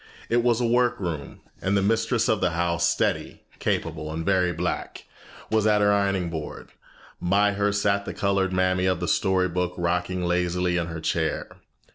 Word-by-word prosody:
It 120 +1 +3
was 120 -1 +2
a 120 - +1
workroom, 115 - -1 0.2
and 100 +1 +1
the 100 - +1
mistress 115 +2 +1
of 110 -2 +1
the 90 - +3
house, 85 -1 +1
steady, 85 - -1 0.2
capable, 75 0 -2
and 80 +1 -4
very 95 -2 +2
black, - - -4 0.5
was 110 -1 +3
at 105 -1 +4
her 105 0 +4
ironing 100 -4 0
board. 80 -2 -6 0.5
By 100 +3 +3
her 100 +1 +1
sat 100 0 +1
the - - -5
colored 100 -2 +1
mammy 95 0 +1
of 95 -2 +1
the 90 - -2
story 95 0 +2
book 90 0 -2
rocking 90 +1 -1
lazily 90 0 0
in 85 -1 0
her 80 -1 -6
chair. - - -2
95 Hz, 175 wpm, -25 LUFS, 90-105 Hz, 0.5 s, at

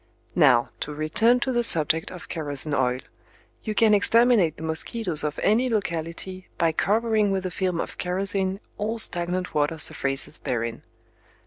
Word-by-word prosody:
Now, 130 -8 +4
to 150 - -5
return 225 +11 +2
to 260 - 0
the 240 -1 +1
subject 160 -6 +2
of 180 - -10
kerosene 150 -1 -2
oil, 125 -2 0 0.6
you 215 -1 -4
can 220 -1 +4
exterminate 225 -4 +4
the - - -9
mosquitoes 160 +2 -2
of 150 -1 -3
any 235 +5 +2
locality 185 -2 -4
by 165 -1 +2
covering 215 +4 +1
with 190 -1 -1
a 185 - -3
film 180 -1 -2
of - - -5
kerosene 190 +1 0 0.2
all 220 +2 -2
stagnant 180 -3 0
water 150 +2 0
surfaces 140 -2 -1
therein. 115 -2 -3
180 Hz, 150 wpm, -24 LUFS, 155-215 Hz, 0.6 s, Now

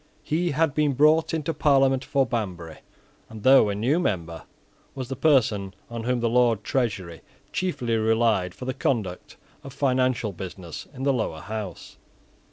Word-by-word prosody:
He 170 +3 0
had 155 -1 +1
been 150 -1 +1
brought 155 +4 +4
into 160 0 -2
Parliament 135 -3 +3
for 140 -1 +1
Banbury, 90 -9 -4 0.5
and 110 -2 -10
though 130 -5 +6
a 100 - -2
new 125 +11 +1
member, 85 - -3 0.5
was 130 -2 -5
the 135 - -3
person 115 -10 +2 0.2
on 115 -1 -5
whom 125 -1 0
the 120 - +1
Lord 115 -3 +2
Treasurer 100 -11 -2 0.3
chiefly 125 -11 -1
relied 110 -4 +1
for 125 - -8
the 130 - -2
conduct 110 -9 -3 0.3
of 135 - -9
financial 130 -5 +1
business 90 -2 -8
in 135 -2 -8
the 140 0 +3
Lower 95 -10 -2
House. 105 -2 -7
120 Hz, 160 wpm, -25 LUFS, 105-135 Hz, 0.5 s, though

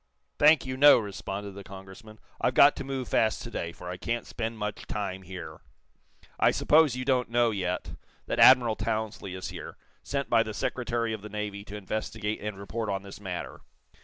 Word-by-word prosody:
"Thank 150 -1 +6
you, 130 0 -4
no," 145 +2 +8
responded 100 -1 -5
the 100 +1 -10
Congressman. 95 +3 -12 0.2
"I've - - +1
got - - +7
to - - -4
move 135 -2 -4
fast 110 -1 +1
to 115 - -8
day, 85 -6 -3
for 90 - -11
I 90 0 -5
can't 115 +5 -3
spend 115 0 -4
much 105 0 -5
time 95 -3 -3
here. 85 -4 -9 0.8
I - - +5
suppose 150 -4 +4
you 125 0 -4
don't 125 -3 +1
know, 120 -1 +3
yet, 90 -3 -3 0.3
that - - -2
Admiral 120 -4 +7
Townsley 110 -3 -3
is 95 - -5
here - - -8 0.2
sent 140 0 -3
by 115 -1 +4
the 110 -2 -4
Secretary 115 -2 -1
of 110 - -5
the 105 - -9
Navy 105 -1 -5
to 105 +1 -7
investigate 105 +1 -4
and 105 -2 -5
report 110 +3 -4
on 100 0 -2
this 100 +1 -11
matter." 90 -3 -6
110 Hz, 190 wpm, -28 LUFS, 100-120 Hz, 0.8 s, no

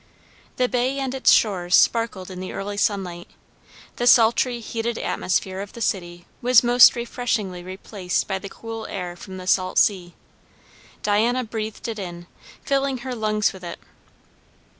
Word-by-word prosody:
The 250 - +2
bay 255 +2 0
and 265 -2 -2
its 265 - +4
shores 185 -4 +3
sparkled 210 -5 +2
in 180 - -7
the 185 - -6
early 200 +1 -4
sunlight; 190 -4 -1 0.7
the 240 - 0
sultry, 240 +1 +4
heated 230 0 -3
atmosphere 190 +1 -1
of 205 - -8
the - - -9
city 175 -5 -2 0.2
was 250 -1 +5
most 245 +1 +7
refreshingly 230 -6 -2
replaced 185 0 -3
by 190 -1 -2
the 200 - -8
cool 225 0 -7
air 180 -3 -5
from 185 +1 -10
the 185 - -8
salt 185 0 +1
sea. 180 -4 +2 0.9
Diana 230 +5 +2
breathed 220 -1 -5
it 225 -2 -4
in, 175 -2 -7 0.4
filling 275 -1 0
her 260 - -3
lungs 215 -2 0
with 190 -1 -12
it. 170 -1 -6
210 Hz, 155 wpm, -23 LUFS, 185-240 Hz, 0.9 s, most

